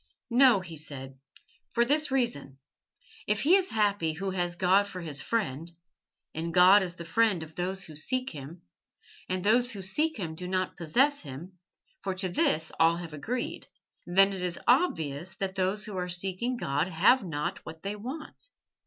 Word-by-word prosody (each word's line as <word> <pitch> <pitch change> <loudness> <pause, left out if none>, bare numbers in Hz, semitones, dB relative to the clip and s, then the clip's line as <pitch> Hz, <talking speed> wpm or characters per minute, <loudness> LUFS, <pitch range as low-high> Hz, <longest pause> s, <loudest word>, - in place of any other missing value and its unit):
"No," 245 -4 +6
he 170 -3 -8
said, 135 -3 -5 0.5
"for 235 0 +3
this 300 +4 +3
reason. 235 - -1 0.7
If 210 0 +1
he 330 +6 +5
is 385 -1 +2
happy 205 -7 +1
who 190 +4 -3
has 175 -2 -1
God 190 +3 +3
for 190 -2 -7
his 150 -6 -4
friend 165 - -2 0.6
(and 165 +1 -3
God 185 +3 +7
is 180 -2 -2
the 170 - -8
friend 205 -2 +2
of 160 0 -12
those 185 +3 -3
who 155 - -11
seek 255 - -1
Him, 150 +3 -10 0.7
and 185 0 -1
those 240 +4 +3
who 195 -2 -7
seek 300 +12 0
Him 170 -6 -4
do 180 +3 -6
not 185 0 -1
possess 260 - +2
Him, 170 +6 -10 0.4
for 190 - -3
to 185 0 -1
this 160 -2 +1
all 165 +1 +4
have 170 -3 -7
agreed), 230 - -4 0.4
then 195 +3 +4
it 190 - -5
is 180 -1 -2
obvious 170 - +1
that 190 0 -3
those 195 +2 -1
who 210 - -7
are 180 0 -3
seeking 190 +7 -1
God 145 -4 -1
have 195 +8 +4
not 150 -5 -4
what 160 0 -10
they 200 +1 -3
want. 275 - -8
185 Hz, 180 wpm, -28 LUFS, 165-215 Hz, 0.7 s, God